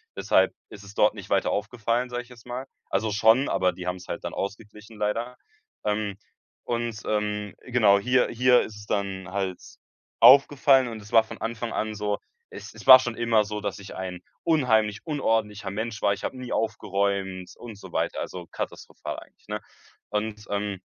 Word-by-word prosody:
Deshalb - - +3 0.2
ist 100 - -11
es 100 0 -12
dort 105 - +4
nicht 100 -2 -10
weiter 100 -1 +2
aufgefallen, 115 +3 -1
sag 120 0 -3
ich 125 - -17
jetzt 120 -3 -15
mal. 125 +2 -5 0.2
Also, 110 +2 0
schon, 110 +6 +4
aber 90 0 +2
die 90 - -8
haben's 90 0 -4
halt - - -5
dann - - -4
ausgeglichen, 105 +2 -7
leider. 115 +4 -2 0.5
Ähm, 105 -2 -1 0.5
und, 120 -2 -3
ähm, 105 -1 -1
genau, 110 -5 +4
hier 125 +4 +2
hier 125 +1 +4
ist 105 - -7
es 105 - -11
dann 95 -2 -2
halt 95 -1 -2 0.6
aufgefallen 135 +1 +7
und 115 -2 -7
es 105 - -14
war 115 -1 +6
von 110 - -10
Anfang 115 0 -3
an 110 0 -2
so 105 -1 -1 0.3
es - - -10
es - - -12
war 130 -1 +12
schon 120 -2 -3
immer 115 -2 +3
so, 105 +1 -4
dass 100 -1 -4
ich 100 0 -10
ein 90 -1 -5 0.2
unheimlich 110 -9 +2
unordentlicher 110 - -1
Mensch 110 +1 -4
war. 100 -1 +4
Ich - - -8
hab - - -2
nie 130 -1 -6
aufgeräumt 100 -3 -1
und 115 -4 -9
so - - -12
weiter, - - -1
also 90 -1 -6
katastrophal - - -6
eigentlich, - - -20
ne? - - -3 0.5
Und, 105 0 -3
ähm, 100 -1 -2
105 Hz, 185 wpm, -26 LUFS, 100-120 Hz, 0.6 s, war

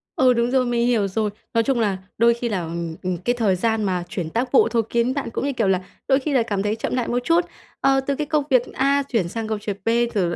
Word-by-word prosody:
Ừ, 255 -1 +4
đúng 235 0 0
rồi, 260 -1 +3
mình 240 0 +1
hiểu 220 -5 +2
rồi. 210 +2 -1 0.2
Nói 230 - +3
chung 265 0 0
là 205 -4 +1 0.2
đôi 235 +1 +5
khi 235 0 -3
là, 190 -4 -1
ừm, 165 0 -4
ừm, 180 -1 -1
cái 210 +8 0
thời 215 -6 +2
gian 220 +3 0
mà 185 -3 -1
chuyển 170 -5 -4
tác 245 +8 -2
vụ 270 - +5
thôi 230 -1 +1
kiến 235 +2 +1
bạn 280 -3 -3
cũng, - - -2
như 280 - -1
kiểu 245 - 0
là, 190 -1 +2 0.3
đôi 270 0 +4
khi 285 +2 -2
là 250 -4 +3
cảm 205 -4 -2
thấy 210 +1 0
chậm 225 - -3
lại 250 -2 -1
một 245 - 0
chút. 335 +5 +3 0.4
Ờ, 270 0 +4
từ 275 +1 -2
cái 300 +1 -3
công 300 -1 +1
việc 255 -2 +5
A 280 +1 +2
chuyển 230 -10 -1
sang 225 +3 -4
công 215 -1 -2
việc 205 -1 -4
B, - - +2 0.2
rồi 190 -6 +1
l 170 - -3
235 Hz, 290 wpm, -22 LUFS, 200-260 Hz, 0.4 s, đôi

